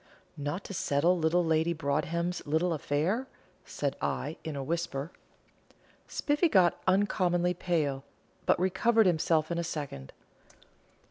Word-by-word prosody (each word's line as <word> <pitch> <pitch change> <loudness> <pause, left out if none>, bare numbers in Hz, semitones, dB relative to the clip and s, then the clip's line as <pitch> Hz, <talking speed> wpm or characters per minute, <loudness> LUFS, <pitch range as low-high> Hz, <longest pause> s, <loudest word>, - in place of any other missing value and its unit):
"Not 145 +6 -4
to - - -7
settle 170 +1 +2
little 170 +1 +2
Lady 160 +1 +2
Broadhem's 165 +4 -1
little 160 +4 +1
affair?" 165 - -1 0.4
said - - -3
I, - - -2
in 160 -2 -5
a 140 - -3
whisper. 160 0 -3 1.0
Spiffy 295 +4 +1
got 185 - +3
uncommonly 180 -2 +2
pale, 155 -6 -1 0.4
but - - +4
recovered 215 +5 +3
himself 160 -2 +2
in 170 - -1
a - - -1
second. 145 - -5
170 Hz, 125 wpm, -30 LUFS, 155-180 Hz, 1.0 s, but